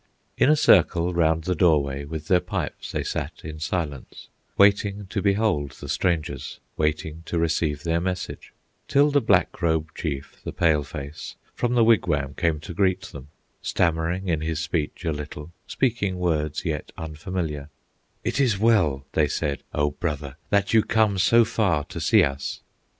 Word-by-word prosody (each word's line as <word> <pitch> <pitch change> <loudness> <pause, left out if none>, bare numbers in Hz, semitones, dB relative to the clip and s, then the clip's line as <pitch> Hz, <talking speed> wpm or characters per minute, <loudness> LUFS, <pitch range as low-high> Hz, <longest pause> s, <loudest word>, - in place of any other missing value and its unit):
In - - +3
a 155 - +6
circle 90 - +4
round 80 -1 +2
the 90 +2 0
doorway, 70 -5 +2
With 80 +1 -6
their 90 0 +4
pipes - - -4
they - - -2
sat - - -3
in 80 0 -7
silence, 75 -4 -4 0.3
Waiting 100 0 +3
to 100 - -1
behold 100 -9 +1
the - - -10
strangers, 75 -6 -2 0.2
Waiting 75 +1 -1
to 85 - -2
receive 80 -3 0
their 85 0 0
message; 90 -1 -4 0.4
Till 145 +1 +4
the 145 0 +3
Black 95 -4 +2
Robe 80 -2 +1
chief, 70 -4 -5
the - - -4
Pale 75 -3 +2
face, 70 +1 -7 0.2
From 120 0 -1
the 120 - +5
wigwam 75 -11 +2
came 80 0 0
to 85 +2 -7
greet 95 0 +1
them, 70 -1 -10 0.3
Stammering 85 +3 0
in 80 -3 0
his 80 -1 -2
speech 80 +1 -3
a 80 - +1
little, 75 +1 -7 0.2
Speaking 110 -8 0
words 80 -3 -1
yet 75 -4 -3
unfamiliar; 80 -2 -4 0.5
"It - - -1
is 125 -8 +3
well," 90 -12 +2
they 75 0 +2
said, 70 0 -2
"O 75 0 +1
brother, 75 -3 -4
That 100 +1 +1
you 110 - +6
come 105 -3 +2
so 115 +5 +5
far 100 -9 +1
to - - -7
see - - +5
us!" 70 0 -3
80 Hz, 165 wpm, -24 LUFS, 75-95 Hz, 0.5 s, a